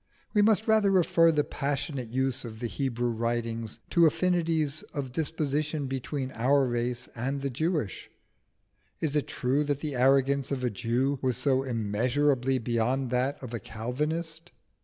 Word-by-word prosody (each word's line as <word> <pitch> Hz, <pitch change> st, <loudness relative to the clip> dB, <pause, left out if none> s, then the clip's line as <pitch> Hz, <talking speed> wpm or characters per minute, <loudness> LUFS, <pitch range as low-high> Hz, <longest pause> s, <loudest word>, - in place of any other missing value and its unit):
We 210 Hz, -, +4 dB
must 220 Hz, +1 st, +3 dB
rather 220 Hz, -2 st, +4 dB
refer 170 Hz, -3 st, +4 dB
the 150 Hz, -2 st, +2 dB
passionate 140 Hz, -4 st, -3 dB
use 130 Hz, +1 st, -1 dB
of 110 Hz, -2 st, -8 dB
the 120 Hz, -, -3 dB
Hebrew 120 Hz, -1 st, -1 dB
writings 115 Hz, -1 st, -2 dB
to 170 Hz, -1 st, +6 dB
affinities 160 Hz, -3 st, +1 dB
of 135 Hz, -3 st, -3 dB
disposition 150 Hz, 0 st, -1 dB
between 135 Hz, 0 st, -3 dB
our 135 Hz, +4 st, +3 dB
own 125 Hz, -, -2 dB
race 120 Hz, 0 st, -2 dB
and 135 Hz, +4 st, -2 dB
the 140 Hz, -, -1 dB
Jewish. 155 Hz, -, -2 dB, 0.9 s
Is 155 Hz, -2 st, -1 dB
it 150 Hz, -, +1 dB
true 135 Hz, +4 st, 0 dB
that 145 Hz, -1 st, -1 dB
the 150 Hz, -2 st, -3 dB
arrogance 135 Hz, +1 st, +3 dB
of 135 Hz, -2 st, -2 dB
a 125 Hz, -, +1 dB
Jew 125 Hz, +5 st, 0 dB
was 130 Hz, -3 st, 0 dB
so 135 Hz, -2 st, +2 dB
immeasurably 125 Hz, +3 st, +1 dB
beyond 120 Hz, +2 st, 0 dB
that 130 Hz, +3 st, +1 dB
of 120 Hz, -2 st, -7 dB
a 120 Hz, -, -2 dB
Calvinist? 150 Hz, -, -4 dB
135 Hz, 160 wpm, -28 LUFS, 120-150 Hz, 0.9 s, to